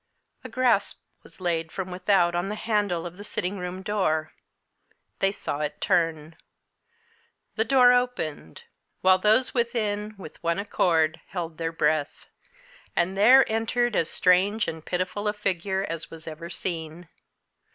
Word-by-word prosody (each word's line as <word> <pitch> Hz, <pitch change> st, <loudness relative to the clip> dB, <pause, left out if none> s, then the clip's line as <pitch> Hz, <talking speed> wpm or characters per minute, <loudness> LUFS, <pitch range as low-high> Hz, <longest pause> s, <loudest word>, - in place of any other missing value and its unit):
A -, -, -8 dB
grasp 245 Hz, -5 st, +1 dB, 0.2 s
was -, -, -18 dB
laid 165 Hz, -3 st, -1 dB
from 190 Hz, -1 st, -5 dB
without 180 Hz, -1 st, +2 dB
on 175 Hz, +3 st, -1 dB
the 210 Hz, -, -3 dB
handle 205 Hz, -6 st, -1 dB
of 175 Hz, +1 st, -8 dB
the 205 Hz, -, -9 dB
sitting 195 Hz, -1 st, -3 dB
room 180 Hz, +1 st, -5 dB
door. 160 Hz, -6 st, 0 dB, 0.9 s
They 195 Hz, -, +2 dB
saw 145 Hz, -7 st, -4 dB
it 150 Hz, -1 st, -3 dB
turn. 165 Hz, -4 st, 0 dB, 1.2 s
The 220 Hz, -, +1 dB
door 250 Hz, 0 st, +6 dB
opened 245 Hz, -, -2 dB, 0.4 s
while 185 Hz, 0 st, +5 dB
those 215 Hz, +6 st, +3 dB
within, 215 Hz, -3 st, -1 dB
with 160 Hz, -5 st, -11 dB
one 170 Hz, 0 st, 0 dB
accord, 160 Hz, -5 st, +1 dB
held 170 Hz, -3 st, -5 dB
their 165 Hz, 0 st, -1 dB
breath. 155 Hz, -2 st, 0 dB, 0.7 s
And 185 Hz, +3 st, +1 dB
there 250 Hz, +7 st, +7 dB
entered 225 Hz, +1 st, 0 dB
as 165 Hz, -, +1 dB
strange 195 Hz, +4 st, +3 dB
and 160 Hz, -1 st, -5 dB
pitiful 185 Hz, +4 st, -2 dB
a 210 Hz, -, +1 dB
figure 195 Hz, -2 st, -1 dB
as 165 Hz, -1 st, -5 dB
was 160 Hz, -1 st, -10 dB
ever 165 Hz, +1 st, -7 dB
seen. 170 Hz, -2 st, -5 dB
185 Hz, 145 wpm, -26 LUFS, 165-210 Hz, 1.2 s, there